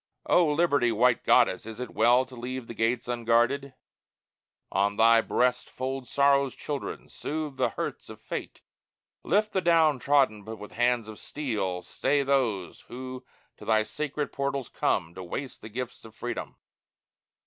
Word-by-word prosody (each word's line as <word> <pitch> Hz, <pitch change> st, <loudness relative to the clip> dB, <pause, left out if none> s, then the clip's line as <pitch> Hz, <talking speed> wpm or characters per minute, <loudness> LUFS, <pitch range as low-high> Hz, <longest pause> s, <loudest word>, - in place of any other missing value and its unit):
O 175 Hz, -2 st, +4 dB
Liberty, 145 Hz, -6 st, +3 dB
white 125 Hz, 0 st, +3 dB
Goddess! 95 Hz, -, +4 dB
is 110 Hz, 0 st, -8 dB
it 125 Hz, -, -5 dB
well 120 Hz, +4 st, +4 dB
To 130 Hz, 0 st, -13 dB
leave 125 Hz, +1 st, -5 dB
the 115 Hz, -, -8 dB
gates 115 Hz, +2 st, 0 dB
unguarded? 120 Hz, +3 st, +1 dB, 1.0 s
On 100 Hz, +2 st, +1 dB
thy 115 Hz, +1 st, +6 dB
breast 125 Hz, +2 st, +1 dB
Fold 130 Hz, 0 st, -4 dB
Sorrow's 140 Hz, -1 st, +3 dB
children, 145 Hz, -2 st, -5 dB
soothe 150 Hz, -3 st, -5 dB
the -, -, +2 dB
hurts -, -, -5 dB
of -, -, -10 dB
fate, -, -, -6 dB, 0.6 s
Lift 215 Hz, +1 st, +1 dB
the 190 Hz, -, +1 dB
down 160 Hz, -5 st, +4 dB
trodden, 135 Hz, -6 st, +3 dB
but 110 Hz, +2 st, -7 dB
with 105 Hz, 0 st, -10 dB
hands 120 Hz, -1 st, +1 dB
of 110 Hz, -1 st, -9 dB
steel 105 Hz, -11 st, -3 dB
Stay 140 Hz, +8 st, 0 dB
those 125 Hz, -10 st, 0 dB
who 130 Hz, +1 st, -7 dB, 0.3 s
to -, -, -13 dB
thy 110 Hz, -1 st, +3 dB
sacred 150 Hz, +4 st, -4 dB
portals 140 Hz, -2 st, -2 dB
come 80 Hz, -, 0 dB
To 95 Hz, -, -8 dB
waste 130 Hz, +9 st, -6 dB
the 110 Hz, -, -9 dB
gifts 125 Hz, +2 st, -6 dB
of 110 Hz, -, -13 dB
freedom. 120 Hz, -1 st, -5 dB
125 Hz, 160 wpm, -27 LUFS, 115-140 Hz, 1.0 s, thy